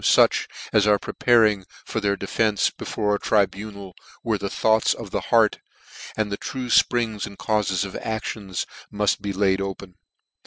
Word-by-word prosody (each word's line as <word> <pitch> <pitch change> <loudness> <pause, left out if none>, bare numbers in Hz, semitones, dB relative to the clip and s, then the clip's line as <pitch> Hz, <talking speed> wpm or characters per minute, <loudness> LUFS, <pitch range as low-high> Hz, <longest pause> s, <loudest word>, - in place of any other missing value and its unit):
from - - +7
fuch - - -3 0.3
as 105 -1 +4
are 105 -1 +5
preparing 110 -2 +2 0.2
for 110 - -2
their 100 -1 0
defence 105 +1 +1
be - - -9
fore 105 -1 0
a 100 - 0
tribunal, 100 -1 -1 0.3
where 110 -3 0
the 100 0 -3
thoughts 110 +2 +2
of' - - -9
the - - -1
heart, - - +4 0.6
and 110 -2 -1
the 100 - -2
true 125 +2 -5
fprings 115 -4 +2
and 100 - -12
caufes 100 -3 0
of 100 - -8
actions 110 -4 -4 0.3
muft 105 -1 0
be 100 - -3
laid 95 0 +1
open.' 95 -1 -6
105 Hz, 170 wpm, -23 LUFS, 100-110 Hz, 0.6 s, from